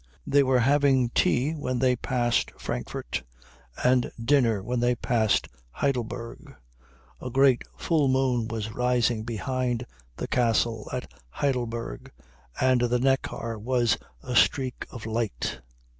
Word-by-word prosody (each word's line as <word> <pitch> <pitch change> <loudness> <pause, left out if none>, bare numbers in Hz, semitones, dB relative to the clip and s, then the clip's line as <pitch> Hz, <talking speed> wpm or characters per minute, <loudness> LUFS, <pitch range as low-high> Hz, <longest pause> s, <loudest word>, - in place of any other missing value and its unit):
They 145 - +4
were 130 -2 +3
having 135 -2 +3
tea 130 +5 +2
when 145 -5 -2
they 125 0 +3
passed 120 -1 0
Frankfurt, - - -4 0.6
and 125 -1 +3
dinner 115 -5 +2
when 125 +3 -1
they 120 +1 +2
passed 115 -4 +1 0.2
Heidelberg. 120 - -3 0.7
A - - -4
great 135 0 +4 0.2
full 155 -4 +1
moon 130 -3 +1
was 110 -1 -4
rising 120 -2 +1
behind 125 +1 -2 0.3
the - - -4
castle 115 -2 +1
at 125 -1 -5 0.2
Heidelberg, 120 - -3 0.5
and 130 -1 +3
the 120 0 +2
Neckar 125 -3 -1
was 120 -2 +1 0.2
a 125 - -4
streak 130 0 +2
of 120 -4 -9
light. 110 - -2
125 Hz, 125 wpm, -26 LUFS, 115-130 Hz, 0.7 s, They